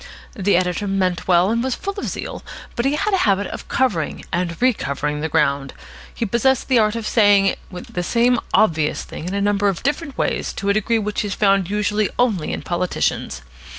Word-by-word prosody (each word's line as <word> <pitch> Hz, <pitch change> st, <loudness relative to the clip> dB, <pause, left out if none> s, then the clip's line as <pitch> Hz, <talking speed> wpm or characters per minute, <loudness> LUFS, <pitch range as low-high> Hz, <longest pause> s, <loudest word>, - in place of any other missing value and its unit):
The 200 Hz, -5 st, +2 dB
editor 180 Hz, +2 st, -1 dB
meant 185 Hz, -2 st, -1 dB
well, 180 Hz, +2 st, +4 dB
and 230 Hz, +1 st, 0 dB
was 260 Hz, -1 st, -1 dB
full 395 Hz, -, -4 dB
of -, -, -4 dB
zeal, -, -, -5 dB, 0.3 s
but 235 Hz, -, -1 dB
he 275 Hz, +2 st, +2 dB
had 410 Hz, +7 st, -1 dB
a -, -, +4 dB
habit 200 Hz, 0 st, +2 dB
of -, -, -7 dB
covering 205 Hz, -, -1 dB
and 175 Hz, -1 st, -1 dB
recovering 150 Hz, -, 0 dB
the 160 Hz, -, -2 dB
ground. 140 Hz, -3 st, 0 dB, 0.4 s
He 230 Hz, -, -3 dB
possessed 240 Hz, +6 st, +1 dB
the 255 Hz, -3 st, +5 dB
art 215 Hz, 0 st, +2 dB
of 230 Hz, -2 st, -4 dB
saying 205 Hz, -3 st, +4 dB, 0.2 s
the 180 Hz, 0 st, -5 dB
same 235 Hz, +6 st, +2 dB
obvious 160 Hz, -8 st, +2 dB
thing 165 Hz, -, -8 dB
in 190 Hz, -, -3 dB
a -, -, 0 dB
number 205 Hz, 0 st, +2 dB
of 190 Hz, -, -4 dB
different 285 Hz, +1 st, -2 dB
ways -, -, -1 dB
to 200 Hz, -, -3 dB
a -, -, +4 dB
degree 215 Hz, +2 st, +1 dB
which 210 Hz, -1 st, -2 dB
is 205 Hz, -2 st, -3 dB
found 195 Hz, -3 st, +2 dB
usually 210 Hz, 0 st, 0 dB
only 220 Hz, -10 st, +1 dB
in -, -, -4 dB
politicians. 175 Hz, -, -2 dB
200 Hz, 200 wpm, -20 LUFS, 180-235 Hz, 0.4 s, the